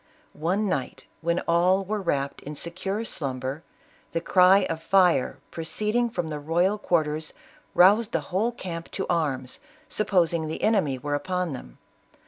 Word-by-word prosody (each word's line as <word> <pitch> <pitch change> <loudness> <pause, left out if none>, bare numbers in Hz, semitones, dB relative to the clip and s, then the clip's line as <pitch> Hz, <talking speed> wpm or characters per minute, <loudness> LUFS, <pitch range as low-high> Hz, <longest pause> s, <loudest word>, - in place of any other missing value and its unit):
One 185 +7 0
night, 135 -9 -3 0.2
when 170 +1 0
all 180 +3 +2
were 210 +1 -2
wrapped 140 -6 -1
in 150 +1 -7
secure 190 +7 -3
slumber, 135 - -4 0.5
the - - +1
cry 185 +3 +5
of 165 0 -4
fire 180 -7 +3
proceeding 210 +8 -1
from 175 -7 -3
the 150 -1 -4
royal 175 +7 +1
quar 170 -5 +2
ters, 155 +1 -5 0.4
roused 205 +5 +5
the - - +1
whole 215 +6 +2
camp 170 -7 -7
to 190 - -2
arms, 135 -7 -1 0.3
supposing 170 -6 +1
the 155 - -5
enemy 190 -12 +2
were 145 +3 -4
upon 180 +1 -1
them. 60 - -9
170 Hz, 150 wpm, -26 LUFS, 150-195 Hz, 0.5 s, cry